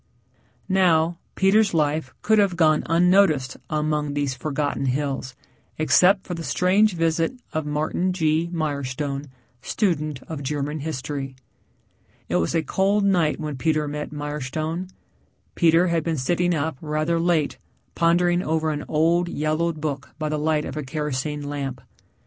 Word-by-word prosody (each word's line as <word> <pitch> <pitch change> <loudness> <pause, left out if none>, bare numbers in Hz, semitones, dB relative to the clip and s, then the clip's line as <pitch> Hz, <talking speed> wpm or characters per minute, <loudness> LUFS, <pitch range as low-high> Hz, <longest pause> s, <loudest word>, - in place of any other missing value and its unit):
Now, 175 -3 +3 0.2
Peter's 195 0 +3
life 150 -3 0
could 220 0 +4
have 200 -3 +2
gone 155 -2 +4
on 165 +2 +3
unnoticed 170 -8 +3
among 150 -1 -1
these 145 -2 0
forgotten 140 +1 -2
hills, 135 -1 -2 0.4
except 180 +6 +4
for 180 - -4
the 165 -1 -5
strange 190 +4 +3
visit 165 +3 +1 0.2
of 155 -1 -2
Martin 155 +5 0
G. 160 -1 +1
Mirestone, 140 -3 -3 0.3
student 155 - -1
of 160 -3 -6
German 145 +2 -2
history. 140 -2 -4 0.9
It - - +2
was 85 - 0
a 165 - +2
cold 195 +6 +1
night 175 -6 +2
when 150 -3 -4
Peter 155 +1 +1
met 150 +1 -4
Mirestone. 150 +4 -4 0.6
Peter 170 +1 +4
had 165 -2 +1
been 165 -1 -1
sitting 175 +6 +1
up 155 -1 -2
rather 155 +2 0
late 165 -3 +1 0.3
pondering 175 +1 +3
over 160 -1 0
an 150 -1 -3
old, 170 +3 +2
yellowed 155 +1 -1
book 145 -3 -4
by 155 -1 -2
the 150 0 -1
light 155 0 +1
of - - -6
a 155 - -2
kerosene 150 0 -3
lamp. 140 -3 -4
155 Hz, 145 wpm, -23 LUFS, 145-170 Hz, 0.9 s, could